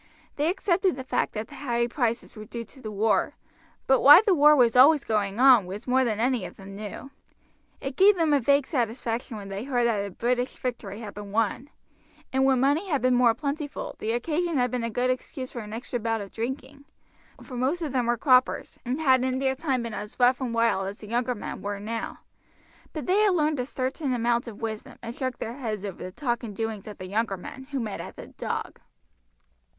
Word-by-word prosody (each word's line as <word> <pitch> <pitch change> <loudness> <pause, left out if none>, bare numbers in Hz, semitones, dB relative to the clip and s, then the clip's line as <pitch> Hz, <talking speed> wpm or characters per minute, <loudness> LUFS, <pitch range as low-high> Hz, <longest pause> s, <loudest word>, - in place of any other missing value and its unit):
They 295 +3 +1
accepted 370 -1 +1
the 260 - -6
fact 260 - -1
that 215 0 -4
the - - -13
high 240 -4 0
prices 235 -2 -2
were 215 -1 -8
due 235 +1 -6
to 265 - -17
the 215 - -5
war, 210 +5 +1 0.5
but 265 -1 +4
why 295 +8 +10
the 405 - +4
war 300 -2 +7
was 245 -4 +4
always 280 +3 +7
going 210 -1 -1
on 250 -7 +7
was 200 +5 -7
more 260 +1 +3
than 220 -4 -1
any 245 -2 +1
of - - -8
them 195 0 -10
knew. 215 +6 -7 0.7
It 270 -1 -5
gave 400 +2 +7
them 325 -4 +2
a 285 - +5
vague 280 +2 +3
satisfaction 235 -3 -2
when 200 -1 -8
they 195 +2 -4
heard 245 -3 +1
that 215 -4 +1
a 200 - -4
British 245 +5 -1
victory 230 -4 -5
had 210 -3 -7
been 205 -1 -8
won; 225 +5 0 0.6
and 265 0 +3
when 265 -2 +4
money 290 +9 +2
had 285 -6 0
been 255 0 +4
more 245 -2 +4
plentiful, 290 +2 -4
the 220 +1 -1
occasion 315 +6 -1
had 250 -1 +1
been 250 -2 -2
a 230 - -1
good 245 +3 +1
excuse 255 +1 -5
for 240 - -6
an 210 -2 -8
extra 240 +2 -4
bout 225 0 -1
of 200 -2 -8
drinking, 265 +4 -5 0.6
for 255 - -9
most 275 +8 0
of 300 - -3
them 250 -3 0
were 240 0 +2
croppers, 255 +1 +2
and 255 +4 -2
had 260 -5 +4
in 260 0 0
their 265 0 +1
time 265 -3 -1
been 230 -2 -5
as 210 +3 -7
rough 250 +2 +4
and 255 - -1
as 230 - -4
wild 230 -4 +2
as 200 +2 -6
the 210 - -11
younger 245 +2 0
men 210 - -6
were 205 0 -4
now; 225 +2 -5 0.7
but 310 - -5
they 375 +3 +3
had 415 -3 +4
learned 305 -3 +1
a 250 - -2
certain 265 +1 -2
amount 235 +1 +1
of 230 0 -9
wisdom, 225 +4 -5
and 230 0 -5
shook 255 -2 -3
their 235 +3 -5
heads 215 -6 -4
over 195 -3 -7
the 185 - -6
talk 240 +1 -2
and 220 -5 -7
doings 220 -2 -4
of 210 - -8
the 185 - -7
younger 200 +1 -1
men 265 +8 -9
who 280 -2 -2
met 215 -4 -4
at - - -9
the - - -9
"Dog." - - -5
245 Hz, 230 wpm, -26 LUFS, 225-270 Hz, 0.7 s, why